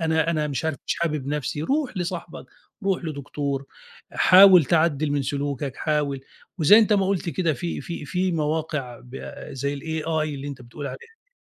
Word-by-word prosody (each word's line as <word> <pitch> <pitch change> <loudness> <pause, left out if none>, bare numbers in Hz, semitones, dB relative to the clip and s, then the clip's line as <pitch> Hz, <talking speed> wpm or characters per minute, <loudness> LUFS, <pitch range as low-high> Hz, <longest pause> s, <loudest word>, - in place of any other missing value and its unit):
أنا 160 0 +1
أنا 155 -2 0
مش 145 +2 -3
عارف 160 -3 -1
مش - - 0
حابب 155 -5 -1
نَفْسي 150 0 -2
روح 270 - -1
لصاحبك، 175 -1 -5 0.4
روح 190 -3 0
لدكتور، 140 -2 -4 0.5
حاول 185 -3 +8
تعدل 155 -3 +2
من 145 -1 0
سلوكك 140 -1 -3
حاول 145 -3 -1 0.4
وزي 185 +8 +7
أنت 215 -1 +4
ما 195 -2 +3
قُلت 195 -2 -1
كده 165 +1 0
في 170 +6 -4
في 170 -3 -6
في 180 +5 -1
مواقع 150 -5 -2
ب 125 +2 -8 0.2
زي 140 +2 -2
الAI 160 +1 -4 0.3
اللي 140 +1 -6
أنت 130 -3 -8
بتقول 140 +5 -8
عليها - - -6
دي. 460 +1 -20
155 Hz, 175 wpm, -24 LUFS, 140-170 Hz, 0.5 s, حاول